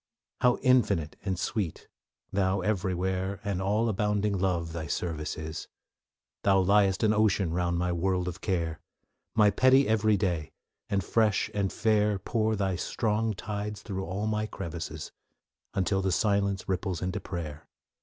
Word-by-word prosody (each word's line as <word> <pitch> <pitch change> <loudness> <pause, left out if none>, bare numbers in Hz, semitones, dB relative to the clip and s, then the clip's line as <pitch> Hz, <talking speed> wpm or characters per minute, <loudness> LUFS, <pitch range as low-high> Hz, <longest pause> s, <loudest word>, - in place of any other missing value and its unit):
How 125 -1 +4
infinite 110 -12 +3
and 95 -3 -1
sweet, 95 -1 -3 0.5
Thou 95 0 +1
everywhere 95 -1 -1
And 100 -3 -2
all 105 +4 +1
abounding 105 -1 +1
Love, 90 -3 0
Thy 80 -2 -4
service 75 -2 -3
is! 80 0 -6 0.7
Thou 95 -1 +4
liest 95 +1 +3
an 110 -1 +4
ocean 105 -5 +2
round 85 0 0
my 90 +1 0
world 90 +1 0
of 90 +2 -5
care, 85 -5 -1 0.6
My 105 -2 +5
petty 130 +6 +5
every 110 -1 +3
day; 85 -6 -1 0.4
and 100 -1 +1
fresh 110 -3 +2
and 100 -2 0
fair, 105 -2 +2
Pour 110 +3 0
Thy 95 -3 0
strong 110 +2 0
tides 105 +1 -5
through 95 -2 -4
all 95 +5 -3
my 110 0 0
crevices, 80 -6 -6 0.6
Until 95 0 +1
the 95 0 0
silence 100 0 +1
ripples 95 -2 -2
into 95 +3 -2
prayer. 80 -6 -6
95 Hz, 145 wpm, -29 LUFS, 90-105 Hz, 0.7 s, My